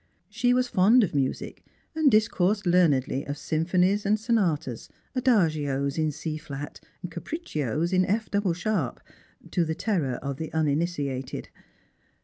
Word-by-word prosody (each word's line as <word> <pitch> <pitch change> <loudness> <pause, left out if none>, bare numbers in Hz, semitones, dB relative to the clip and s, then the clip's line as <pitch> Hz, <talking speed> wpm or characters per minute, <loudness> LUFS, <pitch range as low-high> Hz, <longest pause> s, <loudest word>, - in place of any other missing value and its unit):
She 240 +3 +1
was 250 0 +2
fond 225 +3 +5
of 185 - -1
music 135 -2 -2 0.3
and 315 -2 +4
discoursed 210 -2 +2
learnedly 150 -7 +3
of 145 +1 -4
symphonies 180 +7 +1
and 210 +2 +2
sonatas, 180 - -1 0.3
adagios 155 - +1
in 155 -1 +2 0.3
flat 145 0 -7 0.2
and 180 - -5
capriccios 170 - -3
in 185 0 +4
F 215 +4 -1
double 200 -3 +1
sharp, 180 - -2 0.5
to 175 - +2
the 160 -1 -2
terror 165 - -1
of 140 +1 -5
the 160 +1 -5
uninitiated. 145 -4 -1
175 Hz, 130 wpm, -26 LUFS, 145-210 Hz, 0.5 s, fond